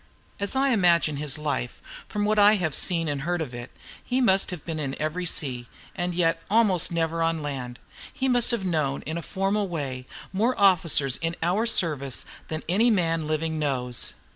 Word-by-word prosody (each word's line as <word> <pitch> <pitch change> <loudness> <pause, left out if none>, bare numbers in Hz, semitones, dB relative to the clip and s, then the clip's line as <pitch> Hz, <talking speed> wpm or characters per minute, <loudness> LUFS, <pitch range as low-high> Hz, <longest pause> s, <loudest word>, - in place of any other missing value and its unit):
As 200 +5 -1
I 270 +1 +2
imagine 170 - +3
his 145 -2 -3
life, 145 -5 -3 0.3
from 210 -1 -2
what 215 0 +2
I 205 +1 +7
have 175 -7 -1
seen 165 +1 +2
and 145 -2 -2
heard 175 +4 -1
of 150 -6 -4
it, 120 +1 -7 0.3
he 255 +1 -1
must 195 -6 +3
have 180 -5 -7
been 160 -2 -4
in 135 -3 -4
every 170 +4 -2
sea, 125 -7 -1 0.3
and 175 -1 -2
yet 165 -1 +1
almost 200 -6 +3
never 165 0 -1
on 165 -1 0
land. 130 -4 -5 0.3
He 265 - -2
must 245 -2 +3
have 235 -6 0
known, 150 -6 -1
in 160 - -5
a - - -6
formal 195 +3 -1
way, 135 -7 -5 0.3
more 225 +6 0
officers 170 -9 +3
in 165 0 -3
our 195 +7 +1
service 150 - +1 0.2
than 155 0 -5
any 210 +8 +3
man 165 -7 +1
living 155 0 -2
knows. 125 -5 -1
165 Hz, 190 wpm, -25 LUFS, 150-195 Hz, 0.3 s, I